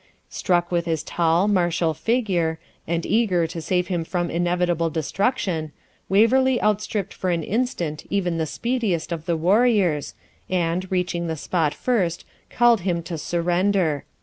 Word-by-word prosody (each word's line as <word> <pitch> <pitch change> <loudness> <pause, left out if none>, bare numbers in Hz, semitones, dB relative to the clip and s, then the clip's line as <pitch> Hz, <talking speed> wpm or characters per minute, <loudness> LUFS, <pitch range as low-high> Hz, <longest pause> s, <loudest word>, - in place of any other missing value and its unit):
Struck 175 -1 0
with 170 -1 0
his 160 -2 -1
tall, 170 +4 +1
martial 175 -4 +1
figure, 180 - 0 0.3
and 170 0 -1
eager 200 -7 +2
to 165 +1 -5
save 180 +2 0
him 175 -3 -2
from 175 +1 -2
inevitable 175 -1 +1
destruction, 160 - -1 0.4
Waverley 245 +6 +4
outstripped 210 -1 -1
for 185 - -3
an 170 -2 0
instant 180 - -2
even 180 -4 0
the 160 - -1
speediest 220 - -2
of 165 -2 -4
the 170 -2 +1
warriors, 190 - +2 0.3
and, 180 +1 -1
reaching 180 -2 -1
the 160 -1 -3
spot 155 -1 0
first, 185 -9 -1 0.2
called 240 -2 +4
to 175 - -12
him 170 -3 0
to 170 - -5
surrender. 175 -1 0
175 Hz, 150 wpm, -23 LUFS, 165-200 Hz, 0.4 s, Waverley